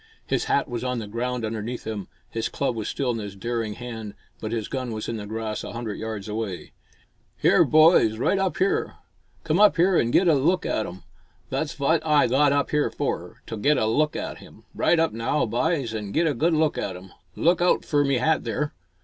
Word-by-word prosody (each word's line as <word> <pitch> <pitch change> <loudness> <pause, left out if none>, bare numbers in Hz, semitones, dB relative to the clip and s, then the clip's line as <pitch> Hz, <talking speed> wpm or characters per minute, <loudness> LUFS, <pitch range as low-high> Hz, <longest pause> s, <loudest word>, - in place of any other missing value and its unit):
His - - 0
hat 140 - +1
was 120 -1 -4
on 125 -1 -1
the 110 - -4
ground 120 +2 -3
underneath 110 +2 -4
him, 105 -3 -4 0.2
his 115 0 -3
club 135 -4 -1
was 110 -2 -4
still 130 -3 -1
in 115 - -3
his 100 -2 -6
daring 115 0 -3
hand, 110 -4 -7 0.2
but 110 - -5
his 115 -3 -2
gun 130 -3 -4
was 110 -1 -4
in 115 - -3
the 105 -1 -7
grass 110 0 -4
a - - -7
hundred 115 -3 -5
yards 110 -2 -5
away. 105 -4 -4 0.7
"Here, - - +5
boys, 155 -8 +5
right 190 - +1
up 190 -1 0
here. 195 +1 0 0.5
Come 165 +3 +1
up 210 0 +6
here 180 +2 +3
an' 115 - +2
get 180 +9 +3
a 165 - +6
look 150 +6 +2
at 110 - -1
'im! 90 +1 -10 0.5
Thot's 155 - -2
vaght 150 +3 +2
Oi 150 -2 +4
got 140 +4 +3
up 140 +1 0
'ere 150 0 +2
fur, - - -4
to - - -5
get 145 +7 +3
a - - +1
good 110 - +2
look 150 +6 +1
at - - -5
'im! - - -15
Right 170 - +2
up 165 0 +2
now, 115 +6 0
byes, 125 +1 0
an' 105 -2 -5
get 165 - +2
a 155 - +2
good 160 +7 +1
look 155 -1 +1
at 95 - -3
'im! 95 +1 -11 0.2
Look 175 +1 +2
out 180 - +2
fur 145 -2 +2
me 140 -1 +1
hat 155 +5 +1
there!" 150 -1 -2
125 Hz, 225 wpm, -25 LUFS, 110-150 Hz, 0.7 s, up